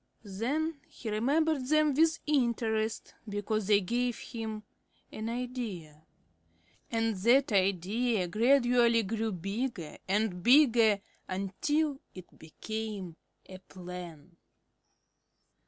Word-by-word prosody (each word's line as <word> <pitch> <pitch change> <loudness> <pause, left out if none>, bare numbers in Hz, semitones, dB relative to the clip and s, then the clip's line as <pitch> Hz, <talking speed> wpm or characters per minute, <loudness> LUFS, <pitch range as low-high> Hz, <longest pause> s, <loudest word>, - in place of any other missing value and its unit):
Then 280 +10 -2
he 225 - -7
remembered 285 +6 +1
them 305 0 +3
with 325 +3 +3
interest 230 -6 0 0.2
because 205 0 -2
they 205 -1 +5
gave 240 +5 -1
him 220 -2 -6 0.5
an 220 +1 -5
idea. 230 -11 -5 0.9
And 225 -1 0
that 245 +7 +3
idea 200 +2 +1
gradually 240 +2 +3
grew 220 +2 -2
bigger 195 -1 -4
and 195 -2 0
bigger 235 - +5 0.3
until 275 +11 -1 0.2
it 185 -1 -12
became 200 +1 -6 0.3
a 185 0 -11
plan. 180 -3 -10
220 Hz, 95 wpm, -30 LUFS, 190-250 Hz, 0.9 s, they